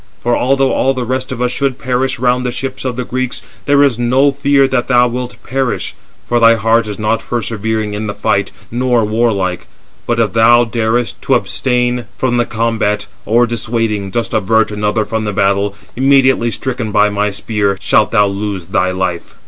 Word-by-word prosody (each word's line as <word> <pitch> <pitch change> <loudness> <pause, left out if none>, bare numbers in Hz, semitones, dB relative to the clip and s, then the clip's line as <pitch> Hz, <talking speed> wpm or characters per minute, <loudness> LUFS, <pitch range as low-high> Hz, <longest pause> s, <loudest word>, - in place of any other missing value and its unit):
For 120 0 +2
although 135 +1 +1
all 135 0 +1
the 130 - -2
rest 130 +2 -3
of 125 -1 -3
us 125 - 0
should 135 0 -1
perish 130 +2 -1
round 125 +1 +1
the 125 - -1
ships 135 +2 -5
of 125 -2 -2
the 125 - -3
Greeks, 130 +1 -3 0.2
there 145 0 +5
is 130 -5 +1
no 130 +4 +3
fear 140 0 +2
that 125 -2 -1
thou 125 -1 +4
wilt 125 +1 -5
perish, 135 -1 -2 0.3
for 120 - +1
thy 115 0 +6
heart 115 0 +2
is 105 - -5
not 110 +1 0
persevering 110 -2 -2
in 105 +1 -4
the 105 - -4
fight, 100 0 0 0.2
nor 120 -1 +1
warlike. 105 -5 -1 0.4
But 120 0 0
if 105 -5 +1
thou 120 +1 +5
darest 115 0 -1
to - - +2
abstain 125 -2 0
from 125 -2 0
the 120 - +2
combat, 110 -2 -1 0.2
or 120 +2 +4
dissuading, 115 -3 -2
dost 115 +5 -3
avert 110 0 +2
another 105 +1 -1
from 110 -1 -3
the 105 - -2
battle, 100 +1 +1 0.2
immediately 130 -2 +3
stricken 120 -1 -3
by 105 0 +3
my 105 0 0
spear, 100 0 -1
shalt 110 - +2
thou 105 -2 +4
lose 100 -2 -3
thy 95 - +1
life." 95 -2 -3
115 Hz, 190 wpm, -15 LUFS, 105-125 Hz, 0.4 s, thy